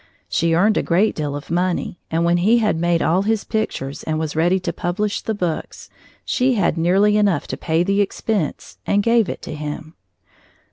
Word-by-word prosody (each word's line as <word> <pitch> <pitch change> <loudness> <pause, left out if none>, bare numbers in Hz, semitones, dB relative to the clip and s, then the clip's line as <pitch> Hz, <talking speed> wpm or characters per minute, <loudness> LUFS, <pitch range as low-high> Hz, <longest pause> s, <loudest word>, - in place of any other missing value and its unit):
She 165 0 +1
earned 210 +5 +3
a - - +3
great 190 +6 +2
deal 145 -2 -3
of 145 +2 -8
money, 180 0 -1
and 165 +1 0
when 170 +1 +3
he 210 +7 +4
had 215 -5 +1
made 170 +1 +1
all 175 +4 +2
his 215 +1 0
pictures 145 -11 -3
and 155 0 -2
was 155 -1 -3
ready 175 +4 +2
to - - -3
publish 200 +4 -2
the 220 - -3
books, 175 -5 -4 0.3
she 255 0 +1
had 200 - +1
nearly 195 +5 +3
enough 200 -7 +2
to - - -2
pay 160 +1 0
the 200 +2 +1
expense, 200 -4 -3
and 200 0 +2
gave 230 -2 +3
it - - -6
to - - -6
him. 150 +1 -6
180 Hz, 195 wpm, -20 LUFS, 165-210 Hz, 0.3 s, he